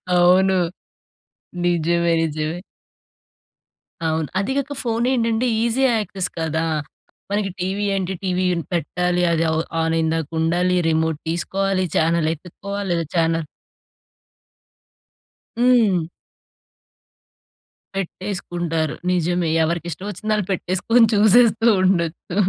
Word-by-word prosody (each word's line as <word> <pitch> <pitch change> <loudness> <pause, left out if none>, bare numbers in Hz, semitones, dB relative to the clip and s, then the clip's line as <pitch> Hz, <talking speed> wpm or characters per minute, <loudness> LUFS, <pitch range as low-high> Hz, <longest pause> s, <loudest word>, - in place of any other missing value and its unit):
అవును. 185 +2 +5 1.1
నిజమే 170 0 +2
నిజమే. 155 +2 -2 1.5
అవును. 160 -1 0
అది 200 +6 -1
కాక 280 +1 -2
ఫోన్ 230 0 0
ఏంటంటే 230 -1 +1 0.2
ఈజీ 235 +3 +1
యాక్సెస్ 195 -3 -3
కదా! 160 0 -1 0.7
మనకి 205 -1 0
టీవీ 195 +3 -1
ఏంటి? 190 -1 -2
టీవీ 185 0 0 0.3
పెట్టాలి, 180 +2 0
అది 165 0 +1 0.4
ఆన్ 160 0 0
అయ్యిందాక 160 -1 0
ఉండాలి, 175 +3 +1
రిమోట్ 160 -1 0
తీసుకోవాలి, 190 +3 -1
ఛానల్ 165 0 +2
వెతుక్కోవాలి, 195 +5 -6
లేదా 170 -1 -1
ఛానల్ 165 -1 +1 2.1
హ్మ్. 225 -9 +4 1.9
పెట్టేసుకుంటారు. 175 -4 -3 0.2
నిజమే 175 -1 0
ఎవరికి 170 +1 -2
ఇష్టం 185 +6 -7
వచ్చింది 210 +3 -4
వాళ్ళు 210 -3 -1
పెట్టేసుకొని 195 +6 +2
చూసేస్తూ 225 +2 +5 0.2
ఉండొచ్చు. 170 -1 0
180 Hz, 95 wpm, -21 LUFS, 165-200 Hz, 2.1 s, అవును